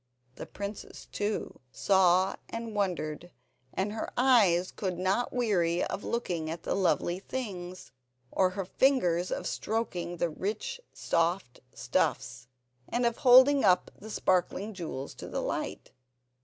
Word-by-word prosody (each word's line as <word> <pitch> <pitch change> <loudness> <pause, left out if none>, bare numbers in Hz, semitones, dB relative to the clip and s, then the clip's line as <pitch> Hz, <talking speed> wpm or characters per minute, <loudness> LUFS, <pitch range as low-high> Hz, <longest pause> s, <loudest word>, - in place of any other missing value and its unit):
The - - -9
princess 200 0 -7
too 205 +1 -3
saw 190 -1 +3
and 230 -1 -5
wondered, 175 -5 -2 0.4
and 195 +2 -2
her 220 - -4
eyes 210 -9 +4
could 185 -4 -3
not 190 +6 0
weary 180 -9 +1
of - - -4
looking 175 -9 -2
at 165 +1 -6
the - - -1
lovely 180 -1 +1
things, 185 - -6 0.4
or 185 -1 +3
her 195 - -2
fingers 185 -7 +2
of - - -3
stroking 180 -6 -3
the 170 0 0
rich 205 - -4
soft 170 -5 -1 0.2
stuffs, 125 -2 -1 0.4
and 240 0 0
of 235 -1 +1
holding 265 +2 +7
up 185 -3 +3
the 220 - -11
sparkling 190 +1 0
jewels 155 -7 -6
to - - -9
the - - -3
light. - - -4
185 Hz, 135 wpm, -29 LUFS, 175-220 Hz, 0.4 s, holding